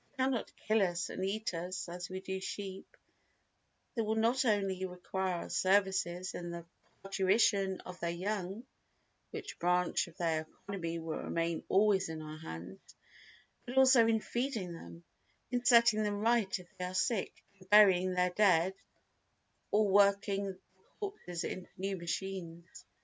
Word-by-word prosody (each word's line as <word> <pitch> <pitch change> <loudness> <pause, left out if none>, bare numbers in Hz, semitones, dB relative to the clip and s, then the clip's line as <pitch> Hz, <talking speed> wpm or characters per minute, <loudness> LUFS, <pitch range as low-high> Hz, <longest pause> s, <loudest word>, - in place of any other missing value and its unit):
They 260 - +1
cannot 260 -3 -1
kill 215 0 +1
us 175 -2 0
and 185 - -4
eat 210 +1 -2
us 180 +3 -4
as 175 +1 -6
we 185 0 -5
do 190 0 -4
sheep, 190 0 -7 1.0
they 230 - -1
will 220 0 0
not 235 +4 +2
only 195 -4 +1
require 185 0 -3
our - - -10
services 190 -2 +1
in 175 0 -5
the 170 -1 -6 0.4
parturition 195 0 +2
of 180 - -10
their 170 - -1
young 195 +4 -3 0.6
(which - - -7
branch 180 0 +1
of 170 - -16
their 160 -2 0 0.2
economy 170 -4 -3
will 160 -1 -4
remain 165 0 -2
always 195 -2 +3
in 160 -1 -5
our 155 0 -8
hands) 85 - -8 0.9
but 250 +2 -5
also 260 -3 +7
in 225 -1 +2
feeding 235 -9 -2
them, 85 - -11 0.5
in 245 -1 0
setting 235 -3 +6
them 205 -1 -1
right 225 -4 +2
if 180 -2 -16
they 180 - -2
are 180 +1 -5
sick, 205 +1 -1 0.2
and 185 -1 -18
burying 185 -3 +6
their 180 0 +2
dead 185 -2 +4 1.0
or 210 +1 +3
working 200 0 +3
up 195 - -4
their 190 0 -31 0.2
corpses 390 - -5
into 185 - -5
new 195 +1 -2
machines. 170 -1 -6
190 Hz, 155 wpm, -33 LUFS, 175-210 Hz, 1.0 s, also